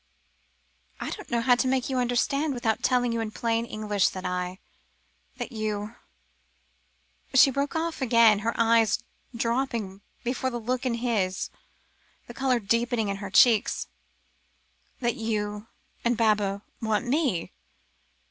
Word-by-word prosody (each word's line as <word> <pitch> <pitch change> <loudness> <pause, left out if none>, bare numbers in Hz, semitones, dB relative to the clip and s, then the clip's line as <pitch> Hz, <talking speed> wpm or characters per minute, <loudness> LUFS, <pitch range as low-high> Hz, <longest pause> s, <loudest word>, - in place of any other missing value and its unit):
"I - - -4
didn't 415 - -7
know 235 -1 +1
how 245 +1 +4
to 245 +1 +1
make 260 -1 +1
you 260 -2 -1
understand 265 +4 0
without 225 -3 0
telling 245 -2 +2
you 230 - -1
in 225 -1 -2
plain 230 +1 -1
English 210 -3 0
that 185 0 -7
I 180 0 -2 0.8
that - - -5
you 215 -1 -3 0.8
" - - -38
She 270 +1 +7
broke 280 +3 -2
off 325 -2 -2
again, 230 -4 +5
her 230 +2 -2
eyes 230 0 +3 0.3
dropping 230 -5 -2 0.2
before 255 +1 -1
the 240 -1 -4
look 250 +3 -2
in 235 - 0
his, 215 -6 -1 0.7
the 240 - -10
colour 255 0 +1
deepening 230 +1 0
in 200 - -2
her 200 -1 -6
cheeks. 220 - +4 1.1
"That 240 -1 0
you 210 -1 -3 0.4
and 235 -1 +1
Baba 210 -3 +1 0.2
want 220 +1 0
me?" 255 - 0
230 Hz, 140 wpm, -27 LUFS, 210-250 Hz, 1.1 s, She